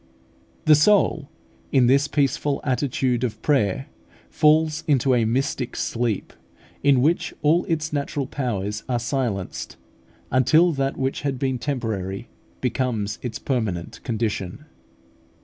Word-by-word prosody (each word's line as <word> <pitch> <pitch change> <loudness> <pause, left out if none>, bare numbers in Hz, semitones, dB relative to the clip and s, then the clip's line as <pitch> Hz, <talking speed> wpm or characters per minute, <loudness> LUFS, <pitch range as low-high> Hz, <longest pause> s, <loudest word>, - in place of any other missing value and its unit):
The 155 - +7
soul 155 -2 +3 0.4
in 130 -3 +4
this 140 +4 +4
peaceful 140 0 0
attitude 130 -2 0
of 120 -4 -2
prayer 135 -2 +1 0.5
falls 155 0 +3
into 135 -3 +3
a 120 -2 +3
mystic 125 +1 -1
sleep, 115 -3 -2 0.5
in 135 -3 +4
which 165 +4 +1
all 160 +4 +3
its 160 -3 -2
natural 140 -1 -2
powers 105 -6 -3
are 125 - +1
silenced, 115 -6 -3 0.5
until 155 +7 +4
that 135 -2 -1
which 135 0 -1
had 140 -2 -2
been 130 -1 -1
temporary 115 -6 -3 0.3
becomes 115 -5 -1
its 120 -3 -4
permanent 110 -10 -3
condition. 110 - -3
130 Hz, 120 wpm, -23 LUFS, 115-145 Hz, 0.5 s, The